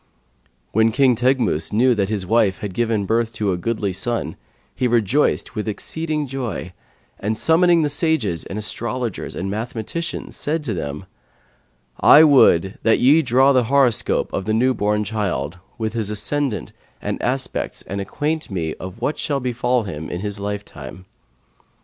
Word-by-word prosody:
When 110 Hz, +1 st, +3 dB
King 130 Hz, +1 st, +4 dB
Teghmus 120 Hz, -, +1 dB
knew 125 Hz, +4 st, +4 dB
that 100 Hz, -3 st, 0 dB
his 105 Hz, -4 st, -2 dB
wife 105 Hz, -1 st, +2 dB
had 100 Hz, -3 st, -6 dB
given 110 Hz, -1 st, 0 dB
birth 115 Hz, +2 st, 0 dB
to 105 Hz, -3 st, -1 dB
a -, -, 0 dB
goodly 105 Hz, +1 st, -2 dB
son, 115 Hz, +5 st, -3 dB, 0.4 s
he 125 Hz, -, 0 dB
rejoiced 120 Hz, +4 st, +1 dB
with 105 Hz, -1 st, -4 dB
exceeding 155 Hz, +7 st, -2 dB
joy 125 Hz, -8 st, -5 dB, 0.5 s
and, 110 Hz, +2 st, -2 dB
summoning 170 Hz, 0 st, +4 dB
the -, -, +2 dB
sages 140 Hz, -, 0 dB
and 95 Hz, -, -7 dB
astrologers 120 Hz, +1 st, -3 dB
and 95 Hz, +2 st, -3 dB
mathematicians, 115 Hz, +9 st, -4 dB
said 155 Hz, +1 st, -2 dB
to 120 Hz, -6 st, -2 dB
them, 75 Hz, 0 st, -5 dB, 0.9 s
'I 155 Hz, -, +8 dB
would 100 Hz, -, +5 dB
that 110 Hz, 0 st, +3 dB
ye 145 Hz, +6 st, +5 dB
draw 135 Hz, +1 st, +4 dB
the 125 Hz, -2 st, +3 dB
horoscope 130 Hz, -2 st, +2 dB
of 95 Hz, -, -2 dB
the 110 Hz, -, 0 dB
newborn 105 Hz, -4 st, +1 dB
child 90 Hz, -, -3 dB, 0.2 s
with 110 Hz, -2 st, -3 dB
his 110 Hz, -3 st, -2 dB
ascendant 105 Hz, -, -2 dB, 0.3 s
and -, -, -3 dB
its -, -, -10 dB
aspects -, -, -2 dB
and 100 Hz, +1 st, -4 dB
acquaint 155 Hz, +9 st, -3 dB
me 85 Hz, -5 st, -2 dB
what 115 Hz, +11 st, -4 dB
shall 145 Hz, -3 st, -1 dB
befall 125 Hz, -1 st, 0 dB
him 80 Hz, -6 st, -6 dB
in 90 Hz, -, -4 dB
his 105 Hz, 0 st, -4 dB
lifetime.' 100 Hz, -5 st, -7 dB
110 Hz, 155 wpm, -21 LUFS, 100-130 Hz, 0.9 s, I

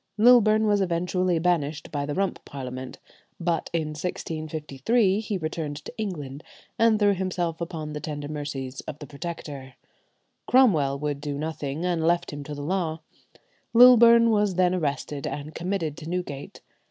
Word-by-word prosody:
Lilburne 220 Hz, -1 st, +6 dB
was 205 Hz, -1 st, +3 dB
eventually 180 Hz, 0 st, 0 dB
banished 160 Hz, -3 st, 0 dB
by 145 Hz, -1 st, -2 dB
the 145 Hz, -, -3 dB
Rump 195 Hz, -1 st, -1 dB
Parliament; 130 Hz, -1 st, -7 dB, 0.4 s
but 170 Hz, -1 st, -1 dB
in 160 Hz, -2 st, -1 dB
1653 155 Hz, -, -1 dB
he 215 Hz, -2 st, -3 dB
returned 155 Hz, -3 st, -4 dB
to -, -, -8 dB
England 155 Hz, -, -5 dB, 0.4 s
and 230 Hz, -1 st, +5 dB
threw 205 Hz, -1 st, +4 dB
himself 175 Hz, -3 st, -2 dB
upon 160 Hz, -3 st, -5 dB
the 150 Hz, -, -4 dB
tender 145 Hz, -1 st, -5 dB
mercies 145 Hz, -3 st, -5 dB
of 145 Hz, -, -5 dB
the 150 Hz, -, -9 dB
Protector. 140 Hz, -3 st, -7 dB, 0.7 s
Cromwell 165 Hz, -, +4 dB
would 145 Hz, -1 st, -3 dB
do 145 Hz, -1 st, -3 dB
nothing, 155 Hz, 0 st, -4 dB
and 175 Hz, -3 st, 0 dB
left 170 Hz, -1 st, +1 dB
him 145 Hz, 0 st, -6 dB
to 150 Hz, -, -6 dB
the 145 Hz, -, -6 dB
law. 165 Hz, -1 st, -1 dB, 0.7 s
Lilburne 235 Hz, -1 st, +8 dB
was 205 Hz, -3 st, +2 dB
then 180 Hz, 0 st, +3 dB
arrested, 145 Hz, -4 st, -2 dB
and 150 Hz, +2 st, -5 dB
committed 170 Hz, -4 st, -2 dB
to 160 Hz, 0 st, -8 dB
Newgate. 175 Hz, -6 st, -5 dB
165 Hz, 155 wpm, -26 LUFS, 145-190 Hz, 0.7 s, Lilburne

